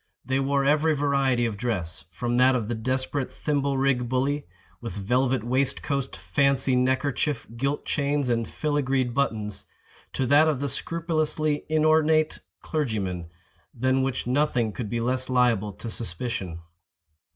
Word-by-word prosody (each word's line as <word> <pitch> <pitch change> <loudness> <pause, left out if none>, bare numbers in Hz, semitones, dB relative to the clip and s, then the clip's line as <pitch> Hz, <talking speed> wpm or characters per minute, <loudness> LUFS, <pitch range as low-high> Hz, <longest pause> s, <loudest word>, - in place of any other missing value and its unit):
They 130 +1 0
wore 140 0 +1
every 155 +2 +3
variety 135 -4 +2
of 110 -3 -2
dress, 90 -9 -3
from 120 +9 -2
that 130 +1 +5
of 115 -4 -1
the 120 - -1
desperate 130 +4 -1
thimble 140 -2 -1
rig 130 -3 +1
bully, 140 +3 0 0.3
with 115 -6 -5
velvet 125 +5 +1
waistcoat, 135 +2 -1
fancy 140 -2 +1
neckerchief, 130 +1 0
gilt 140 +4 -1
chains, 145 -1 0
and 115 -2 0
filagreed 135 -4 0
buttons, 110 -7 -1 0.5
to 130 - 0
that 145 +5 +5
of 150 -5 +1
the 140 0 -1
scrupulously 155 -2 -1
inornate 155 0 +3 0.2
clergyman, 100 - -2 0.5
than 130 +2 +2
which 130 -1 -1
nothing 125 -3 +1
could 110 -1 -5
be 120 - -1
less 130 +2 -1
liable 120 -5 +2
to 110 +3 -7
suspicion. 95 -5 -4
130 Hz, 140 wpm, -26 LUFS, 120-145 Hz, 0.5 s, that